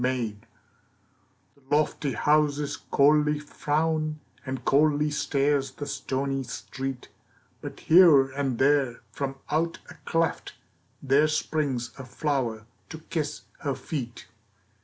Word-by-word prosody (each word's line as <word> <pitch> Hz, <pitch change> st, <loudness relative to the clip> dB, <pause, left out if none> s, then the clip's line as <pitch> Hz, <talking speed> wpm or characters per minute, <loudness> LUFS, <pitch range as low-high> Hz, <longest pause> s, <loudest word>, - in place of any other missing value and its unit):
The 125 Hz, -4 st, 0 dB, 1.4 s
lofty 145 Hz, -2 st, +1 dB
houses 150 Hz, -1 st, +2 dB
coldly 150 Hz, +1 st, +3 dB
frown, 155 Hz, +1 st, -1 dB, 0.2 s
And 130 Hz, -2 st, -5 dB
coldly 150 Hz, +1 st, +3 dB
stares 140 Hz, -1 st, +1 dB
the 145 Hz, -, -6 dB
stony 135 Hz, 0 st, -2 dB
street; 135 Hz, 0 st, -6 dB, 0.5 s
But -, -, -8 dB
here 155 Hz, -6 st, +6 dB
and 135 Hz, -3 st, -2 dB
there 135 Hz, -3 st, +2 dB
from 135 Hz, -1 st, -3 dB, 0.2 s
out 165 Hz, +2 st, 0 dB
a -, -, -9 dB
cleft 165 Hz, -1 st, -1 dB, 0.5 s
There 140 Hz, +3 st, +4 dB
springs 150 Hz, -5 st, -1 dB
a -, -, -6 dB
flower 125 Hz, -5 st, -2 dB, 0.2 s
to 160 Hz, -, -7 dB
kiss 150 Hz, -2 st, -2 dB, 0.2 s
her 140 Hz, -3 st, -2 dB
feet. 130 Hz, -8 st, -6 dB
145 Hz, 110 wpm, -26 LUFS, 135-150 Hz, 1.4 s, here